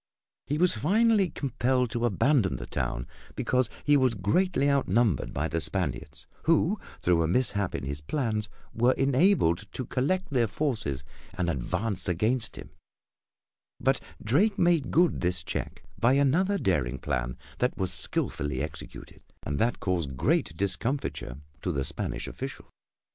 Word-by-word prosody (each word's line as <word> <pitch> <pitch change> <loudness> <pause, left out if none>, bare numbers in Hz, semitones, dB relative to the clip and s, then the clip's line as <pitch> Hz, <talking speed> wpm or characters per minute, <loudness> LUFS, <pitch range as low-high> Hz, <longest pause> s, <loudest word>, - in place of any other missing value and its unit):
He 145 - 0
was 180 +2 +4
finally 200 - +3
compelled 130 -3 0
to 120 +1 0
abandon 120 - +2
the - - -6
town, - - -3 0.3
because 125 -2 +1
he 145 - +4
was 130 -4 +3
greatly 140 - +1
outnumbered 120 - +2
by 75 - -1
the 80 0 -1
Spaniards, 90 -8 -2 0.2
who, 165 +5 +3 0.2
through 85 -2 +2
a 80 - +2
mishap 100 -1 +1
in - - -4
his 70 +2 -4
plans, 110 - -2 0.2
were 120 +3 +3
enabled 135 - +2
to 130 - -4
collect 175 +9 -1
their 120 -4 +2
forces 105 - -2 0.3
and 85 -2 +1
advance 90 - -2
against 110 +7 0
him, - - -10 1.1
but - - +1 0.2
Drake 195 - +2
made 175 -5 +3
good 175 +1 +3
this 90 0 0
check - - -5 0.2
by 120 +3 +4
another 160 +9 +3
daring 70 - 0
plan 60 0 -2 0.2
that 125 - 0
was 95 -3 +1
skilfully 75 -4 0
executed, 75 +3 -7 0.2
and 70 0 -3
that 120 +1 +1
caused 85 -8 -2
great 80 +4 +1
discomfiture 100 - -2 0.2
to 90 - -1
the 70 -4 -1
Spanish - - -4
officials. - - -7
115 Hz, 145 wpm, -28 LUFS, 85-140 Hz, 1.1 s, was